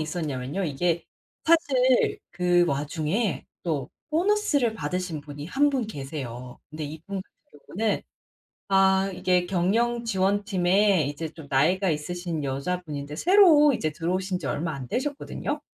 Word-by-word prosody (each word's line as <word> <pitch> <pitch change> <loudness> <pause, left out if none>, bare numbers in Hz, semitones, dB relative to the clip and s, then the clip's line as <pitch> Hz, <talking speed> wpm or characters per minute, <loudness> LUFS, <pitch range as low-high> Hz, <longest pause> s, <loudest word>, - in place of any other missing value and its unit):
있었냐면요. 155 0 -3
이게 165 +2 0 0.4
사실 270 -7 +3
그 175 0 +3
와중에 155 - -1 0.2
또 150 -7 -2 0.2
보너스를 325 - +2
받으신 175 -1 -3
분이 145 0 -8
1 285 +8 +2
분 255 -6 -1
계세요. 135 - -7
근데 155 0 -5
이분 165 +7 -6
같은 150 - -18 0.2
경우는 220 -2 +1 0.6
아 195 0 +3
이게 180 0 +1
경영지원팀에 195 -2 +2
이제 145 +3 -4
좀 160 -2 -12
나이가 175 +8 +2
있으신 165 +1 -3
여자분인데 145 +1 -3
새로 325 - +6
이제 155 -10 -1
들어오신 180 +4 -2
지 - - -5
얼마 160 +2 -2
안 130 -3 -7
되셨거든요. 290 - -3
180 Hz, 290 characters per minute, -26 LUFS, 150-215 Hz, 0.6 s, 새로